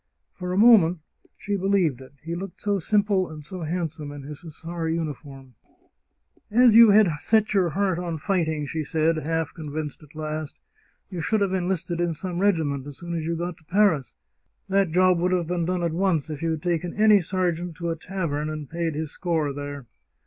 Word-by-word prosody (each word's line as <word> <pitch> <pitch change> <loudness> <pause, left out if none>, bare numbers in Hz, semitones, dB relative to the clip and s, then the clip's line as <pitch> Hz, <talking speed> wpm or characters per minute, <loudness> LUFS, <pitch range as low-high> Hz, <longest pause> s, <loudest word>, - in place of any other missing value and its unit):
For 180 -1 -5
a 180 - -1
moment 205 -6 +6 0.4
she 205 - -2
believed 185 -9 +1
it 130 +1 -13
— - - -37
he 165 - -3
looked 180 +2 -6
so 205 -1 0
simple 200 -1 +2
and 155 - -9
was 150 - -11
so 185 -2 -6
handsome 160 -3 -3
in 145 -1 -9
his 145 +1 -8
hussar 165 0 -6
uniform! 145 -5 -5 0.5
" - - -40 0.2
As 235 - +7
you 230 0 +9
had 210 0 +6
set 220 +5 +2
your 185 -4 +3
heart 190 0 0
on 170 -2 -3
fighting," 160 -4 -1
she 155 +2 -3
said, 160 +2 +1
half 160 0 -2
convinced 155 -1 -6
at 150 0 -18
last, 155 -1 -5 0.3
" - - -41
you 180 -3 -4
should 215 +5 +1
have 195 -2 +1
enlisted 175 -2 -1
in 170 -2 0
some 175 +3 -4
regi 195 -5 +3
ment 140 -2 -3
as 145 - -9
soon 175 0 -6
as 165 -1 -3
you 170 - -1
got 175 0 -4
to - - -24
Paris. 180 -7 +2 0.5
That 195 -1 +2
job 180 +1 +3
would 180 +1 +1
have 175 -2 +1
been 175 0 -1
done 180 0 -1
at 170 -2 0
once 170 -4 0
if 150 - -6
you 165 - 0
had 160 0 -3
taken 175 0 -1
any 210 -1 +5
sergeant 175 -1 -2
to 170 0 -3
a - - -2
tavern 160 -4 -3
and 155 -2 -5
paid 165 -1 -2
his 155 -1 -3
score 160 -5 -1
there." 145 -1 -6
170 Hz, 215 wpm, -25 LUFS, 155-185 Hz, 0.5 s, you